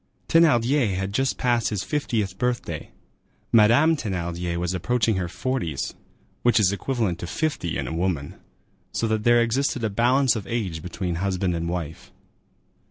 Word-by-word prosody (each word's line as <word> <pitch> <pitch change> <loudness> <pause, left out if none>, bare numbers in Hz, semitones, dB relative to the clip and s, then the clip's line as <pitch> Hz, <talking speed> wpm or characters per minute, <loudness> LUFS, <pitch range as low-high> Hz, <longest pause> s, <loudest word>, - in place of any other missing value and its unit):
Thénardier 130 - +3
had 95 +1 -3
just 135 +3 0
passed 120 -2 +1
his 105 -3 -2
fiftieth 110 -10 -1
birthday; 125 -1 -2 0.6
Madame 120 +9 +5
Thénardier 85 - -3
was 90 +1 -1
approaching 110 +3 +1
her 90 -2 -1
forties, 90 - -3 0.5
which 120 -1 +4
is 100 -3 +4
equivalent 100 -4 -1
to 85 - -5
fifty 145 - -2
in - - -3
a - - -4
woman; 80 -4 -2 0.6
so 115 - -1
that 110 -1 0
there 120 0 +6
existed 125 +1 0
a 110 - 0
balance 125 +4 +3
of 105 -3 -5
age 95 -9 -2
between 90 0 -4
husband 95 -2 0
and 85 0 -2
wife. 85 -3 -5
105 Hz, 155 wpm, -24 LUFS, 90-120 Hz, 0.6 s, there